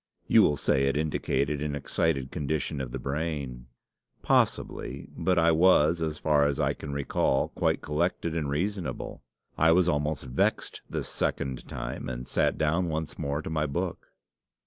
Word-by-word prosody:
You - - +6
will 75 - +3
say 70 0 +2
it 70 - +1
indicated 75 -1 0
an 75 -1 -2
excited 70 -1 -1
condition 75 -1 -2
of 65 -2 -5
the - - -3
brain. 70 -4 -3 0.6
Possibly; - - 0
but 90 -1 +1
I 85 0 +5
was, 85 -1 +4
as 80 -1 -1
far 75 -2 +3
as 70 - -1
I - - +2
can 70 - -7
recall, 70 -1 +1
quite - - 0
collected 85 +1 -1
and 75 -4 -1
reasonable. 85 -2 -3 0.4
I 80 +1 +6
was 90 0 +4
almost 75 -3 0
vexed 65 0 0
this - - -3
second 65 -2 -2
time, - - -5
and 60 0 -5
sat - - +1
down 85 +3 +1
once 80 0 -4
more 70 +2 -2
to - - -5
my 75 -1 0
book. 85 +5 -3
75 Hz, 165 wpm, -28 LUFS, 70-80 Hz, 0.6 s, You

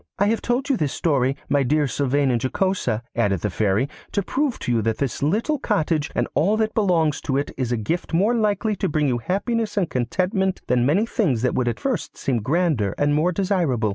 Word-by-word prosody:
'I 200 - +2
have 225 - 0
told 245 +3 -1
you 270 - +1
this 150 -7 -1
story, 135 -4 +1
my 145 0 +2
dear 150 +3 +2
Sylvain 140 0 +1
and 120 -2 0
Jocosa,' 130 - 0
added 100 -6 +1
the 105 - -1
Fairy, 105 +6 +1 0.2
'to 200 - 0
prove 275 +4 -1
to - - -3
you 115 -2 +2
that 110 +1 -1
this 140 -4 -2
little 220 - +1
cottage 160 - 0
and 120 - +1
all 195 +9 +2
that 220 -1 0
belongs 170 -8 +1
to 135 -3 -1
it 140 - -2
is 125 -3 -2
a 120 - +1
gift 160 +12 -3
more 195 +8 +2
likely 215 -1 +1
to - - -1
bring 150 -1 +1
you 125 -2 0
happiness 210 - -2
and 185 -5 0
contentment 185 - 0
than 125 0 +2
many 190 +10 +3
things 150 - 0
that 125 - +1
would 125 - 0
at 120 - -1
first 255 - -3
seem 130 -3 -1
grander 135 - 0
and 145 0 +2
more 155 +5 +2
desirable. 170 - 0
150 Hz, 220 wpm, -22 LUFS, 125-200 Hz, 0.2 s, many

